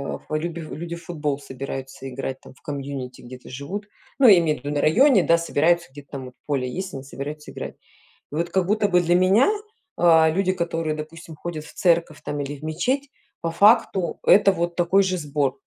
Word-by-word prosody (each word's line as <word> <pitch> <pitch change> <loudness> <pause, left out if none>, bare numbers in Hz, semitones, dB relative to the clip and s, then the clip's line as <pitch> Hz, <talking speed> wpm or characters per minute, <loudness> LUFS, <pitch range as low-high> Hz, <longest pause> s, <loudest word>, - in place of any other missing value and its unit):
э, - - -9 0.2
люби 170 +1 -4
люди 165 +2 -6
в 170 - -12
футбол 150 -5 -2
собираются 135 0 -7
играть, 130 +1 -5
там - - -14
в - - -26
community 135 -3 -5
где-то 125 +1 -11
живут, 180 +11 -6 0.3
ну, 265 -3 +6
я 195 -5 +9
имею 155 -3 0
в - - -23
виду, 145 +1 -3
на 145 - 0
районе, 240 - +5
да, 170 - +4
собираются, 170 -1 +1
где-то 145 0 -13
там, 135 -2 -5
вот, 125 - -11
поле 135 -4 0
есть, 185 +4 -5
они 135 - -6
собираются 145 +2 -7
играть. - - -7 0.6
И - - -9
вот 170 +2 -1
как 190 -2 +1
будто 210 0 +2
бы 180 - +5
для 175 0 +2
меня, 190 - +5 0.5
а, 160 -2 +5
люди, 185 +3 +1
которые, 165 -3 -2
допустим, 160 +1 -8
ходят 155 -1 -6
в - - -13
церковь, 170 -4 +1
там, 145 0 -4
или 145 +1 -4
в - - -19
мечеть, 250 - -1 0.3
по 165 - -2
факту- 200 -1 +3
это 195 -1 +6
вот 170 -1 -2
такой 185 +3 +4
же 185 -1 0
сбор. 145 -4 -1
165 Hz, 205 wpm, -23 LUFS, 145-180 Hz, 0.6 s, я